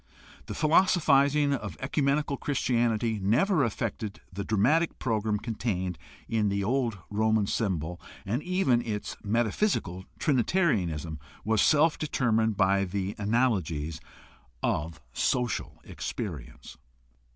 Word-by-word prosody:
The -, -, -5 dB
philoso 175 Hz, +5 st, +4 dB
phizing 140 Hz, -1 st, +3 dB
of -, -, -6 dB
ecumenical 140 Hz, +1 st, 0 dB
Christianity 120 Hz, -5 st, 0 dB
never 140 Hz, -, +3 dB
affected 110 Hz, -2 st, -3 dB
the 100 Hz, +2 st, -3 dB
dramatic 140 Hz, -, +2 dB
program 110 Hz, -3 st, 0 dB
contained 100 Hz, -6 st, -3 dB, 0.3 s
in 110 Hz, -2 st, +1 dB
the 100 Hz, 0 st, -1 dB
old 120 Hz, -1 st, 0 dB
Roman 110 Hz, 0 st, +2 dB
symbol, 90 Hz, -5 st, -2 dB, 0.2 s
and 115 Hz, +8 st, -1 dB
even 180 Hz, -9 st, +2 dB
its 105 Hz, -3 st, -4 dB
metaphysical 110 Hz, -, 0 dB
Trinitarianism 105 Hz, -, +1 dB, 0.3 s
was 110 Hz, -1 st, +2 dB
itself 155 Hz, +1 st, +4 dB
determined 115 Hz, -8 st, +1 dB
by 100 Hz, 0 st, +3 dB
the 95 Hz, +1 st, -3 dB
analogies 95 Hz, -, 0 dB, 0.6 s
of 80 Hz, +1 st, -1 dB
social 125 Hz, -, -1 dB
experience. 80 Hz, -, -6 dB
110 Hz, 105 wpm, -28 LUFS, 100-135 Hz, 0.6 s, philoso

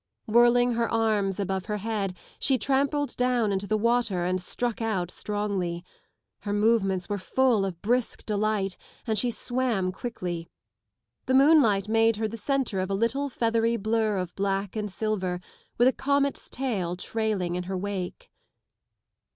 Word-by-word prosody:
Whirling 240 Hz, +2 st, +5 dB
Her 230 Hz, 0 st, 0 dB
arms 210 Hz, -4 st, +1 dB
above 190 Hz, -1 st, -2 dB
her 210 Hz, -1 st, -1 dB
head 205 Hz, -3 st, -2 dB, 0.2 s
she 265 Hz, -1 st, +3 dB
trampled 280 Hz, +2 st, 0 dB
down 245 Hz, -4 st, +2 dB
into 195 Hz, +1 st, -2 dB
the 215 Hz, -, +1 dB
water 230 Hz, -5 st, +1 dB
and 185 Hz, 0 st, 0 dB
struck 240 Hz, +5 st, -3 dB
out 190 Hz, -6 st, -1 dB
strongly. 195 Hz, -5 st, -3 dB, 0.5 s
Her 205 Hz, 0 st, -3 dB
movements 205 Hz, -3 st, +2 dB
were 205 Hz, -2 st, -3 dB, 0.2 s
lull 245 Hz, -7 st, +4 dB
of 180 Hz, -3 st, -5 dB
brisk 240 Hz, +3 st, 0 dB
delight 210 Hz, -3 st, 0 dB, 0.3 s
and 220 Hz, -, 0 dB
she 240 Hz, +4 st, +1 dB
swam 240 Hz, -6 st, -1 dB
quickly. 180 Hz, -6 st, -5 dB, 0.8 s
The 260 Hz, -, +3 dB
moonlight 265 Hz, -9 st, +5 dB
made 225 Hz, +1 st, +3 dB
her 220 Hz, +1 st, -1 dB
the 220 Hz, -, -6 dB
centre 255 Hz, -4 st, -1 dB
of 185 Hz, +1 st, -2 dB
a 195 Hz, -, 0 dB
little 240 Hz, +7 st, 0 dB
feathery 230 Hz, -1 st, +1 dB
blur 220 Hz, -1 st, 0 dB
of 180 Hz, -2 st, -3 dB
black 195 Hz, 0 st, -1 dB
and 210 Hz, -1 st, -2 dB
silver, 190 Hz, -4 st, -2 dB, 0.4 s
with 240 Hz, -, +5 dB
a 260 Hz, -, +4 dB
comet's 280 Hz, 0 st, 0 dB
tail 200 Hz, -10 st, -2 dB
trailing 200 Hz, -2 st, -1 dB
in 180 Hz, 0 st, -3 dB
her 190 Hz, +1 st, -3 dB
wake. 190 Hz, -1 st, -5 dB
215 Hz, 155 wpm, -27 LUFS, 195-240 Hz, 0.8 s, Whirling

